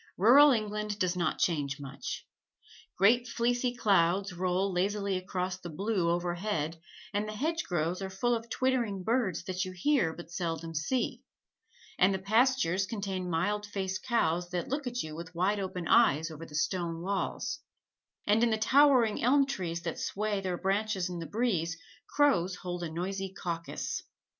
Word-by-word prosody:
Rural 265 +10 +8
England 210 -3 -1
does 185 -3 0
not 175 -1 0
change 145 -5 0
much. 140 -1 -6 0.7
Great 240 +6 +4
fleecy 245 +1 0
clouds 195 -3 +2
roll 185 +2 0
lazily 200 +2 0
across 185 0 -3
the 175 - -7
blue, 190 +1 0
overhead, 175 -2 -1 0.3
and 205 +1 0
the 215 - -5
hedgerows 195 - -1
are 190 - -3
full 220 +6 0
of 230 0 -3
twittering 235 -7 0
birds 220 -7 0
that 185 0 -2
you 185 -1 -5
hear 185 - +2
but 170 +1 -10
seldom 165 -2 -3
see; 235 +9 -1 0.8
and 190 +2 +5
the - - 0
pastures 200 -2 +2
contain 195 -4 -3
mild 205 +5 0
faced 190 -2 -3
cows 175 -7 0
that 175 -1 -3
look 275 0 -2
at 245 0 -2
you 155 -1 -7
with 170 +1 -8
wide 195 +4 +1
open 185 -3 -4
eyes 165 -9 +4
over 160 +1 -8
the 150 - -10
stone 170 0 -1
walls; 200 - -2 0.7
and 210 +2 +3
in 240 - +4
the 220 - +1
towering 255 -1 +4
elm 275 +3 +4
trees 175 -11 -4
that 165 -2 -4
sway 210 -1 -1
their 185 -2 -2
branches 195 -1 0
in 175 - -4
the 165 - -5
breeze 180 -8 0 0.3
crows 190 -12 +2
hold 180 -2 -5
a 170 - -3
noisy 190 +3 -3
caucus. 170 -3 -4
190 Hz, 160 wpm, -30 LUFS, 175-220 Hz, 0.8 s, Rural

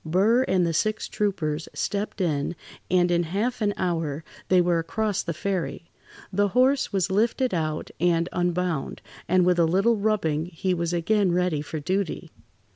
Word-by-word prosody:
Burr 195 +9 +3
and 185 -2 +2
the 165 - 0
six 215 +6 0
troopers 165 -7 -2
stepped 205 0 -2
in, 155 -2 -1 0.3
and 175 -1 +3
in 170 0 +3
half 205 +9 -2
an 205 -1 +2
hour 165 -4 -2 0.2
they 185 - +4
were 175 -1 +2
across 205 +4 -1
the 170 - -4
ferry. 170 -1 -3 0.4
The 205 +2 +3
horse 265 +2 +3
was 195 -1 0
lifted 230 +5 +1
out, 155 -3 -2
and 170 0 +2
unbound, 175 -4 -1 0.2
and 180 +1 +3
with 180 -1 +3
a 170 - +5
little 195 +8 +2
rubbing 185 -7 0
he 185 +2 -2
was 170 -1 -1
again 185 +3 +2
ready 180 -4 +1
for 155 +1 -5
duty. 185 +3 -2
180 Hz, 165 wpm, -25 LUFS, 165-200 Hz, 0.4 s, a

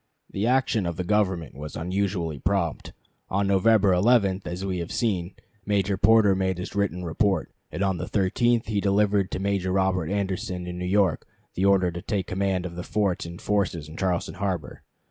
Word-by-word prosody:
The 100 +4 -1
action 125 -6 +2
of 85 - -3
the 90 - -2
Government 95 - 0
was 75 +1 -8
unusually 90 -3 -2
prompt. 85 -2 -1 0.4
On 100 +1 +1
November 100 0 +4
11, 100 0 +3
as 90 +2 -4
we 95 -2 -2
have 85 0 -5
seen, 95 -6 -1 0.3
Major 100 -1 +1
Porter 110 0 +5
made 95 -1 0
his 90 - -6
written 100 -3 -1
report, 95 +1 0 0.2
and 95 - -2
on 95 -2 +1
the 90 +3 -4
13th 115 +4 +1
he 105 -2 -1
delivered 100 -1 +2
to - - -3
Major 95 -1 -1
Robert 95 -3 +1
Anderson 95 -2 -2
in 90 0 -6
New 90 - -3
York 100 0 +1 0.3
the 95 - 0
order 95 -2 +4
to 85 +1 -6
take 100 -1 -2
command 95 -1 -1
of 85 -1 -6
the 90 - -4
forts 95 -2 -1
and 85 +1 -9
forces 100 -8 -1
in 80 - -11
Charleston 90 -1 -1
harbor. 95 -5 -3
95 Hz, 185 wpm, -25 LUFS, 90-100 Hz, 0.4 s, Porter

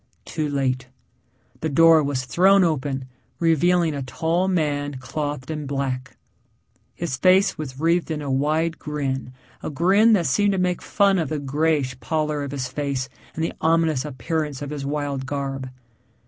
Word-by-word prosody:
Too 155 -2 -2
late. 130 -2 -1 0.7
The 160 - -2
door 165 +2 +6
was 140 -3 -2
thrown 190 +8 +5
open 140 -5 -1 0.3
revealing 170 0 +3
a 140 - -3
tall 160 +9 0
man 145 -5 0
clothed 145 +1 -4
in 150 -2 -4
black. 135 -2 -3 0.8
His 160 -7 -3
face 185 +5 +4
was 135 -4 -7
wreathed 170 +2 +2
in 155 -2 -2
a 145 -2 -3
wide 155 +4 0
grin 135 -4 -3 0.3
a - - -4
grin 190 +9 +4
that 180 -5 +3
seemed 200 +10 +2
to - - -1
make 180 -1 0
fun 200 -2 +2
of 160 -5 -1
the 155 - -2
grayish 145 -2 0
pallor 150 +4 -1
of 140 - -4
his 135 -2 -3
face 135 0 -3 0.3
and 160 - -2
the 165 - -1
ominous 160 -4 +2
appearance 150 +1 -3
of 145 - -6
his 145 -2 -4
wild 140 -2 -2
garb. 135 -1 -3
150 Hz, 160 wpm, -23 LUFS, 135-165 Hz, 0.8 s, door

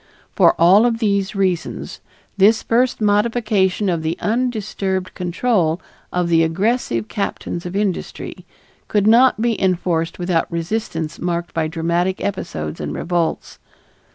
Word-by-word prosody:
For - - +5
all 190 +7 +6
of 230 -1 0
these 200 -3 0
reasons 185 -3 -2 0.3
this 210 +3 +4
first 240 +1 +1
modification 210 -2 +1
of 170 -3 0
the 160 +1 -2
undisturbed 210 -5 -2
control 180 -2 0 0.3
of 180 -1 0
the 165 -1 +4
aggressive 165 - 0
captains 180 - -4
of 175 - -7
industry 200 -3 -3 0.4
could 205 -2 +1
not 235 +2 +5
be 230 -1 0
enforced 175 -3 0
without 175 -2 0
resistance 170 -2 -3
marked 175 -1 -3
by 160 -1 0
dramatic 170 +3 -1
episodes 80 - -4
and 75 0 -4
revolts. 170 -2 -2
185 Hz, 125 wpm, -20 LUFS, 170-215 Hz, 0.4 s, all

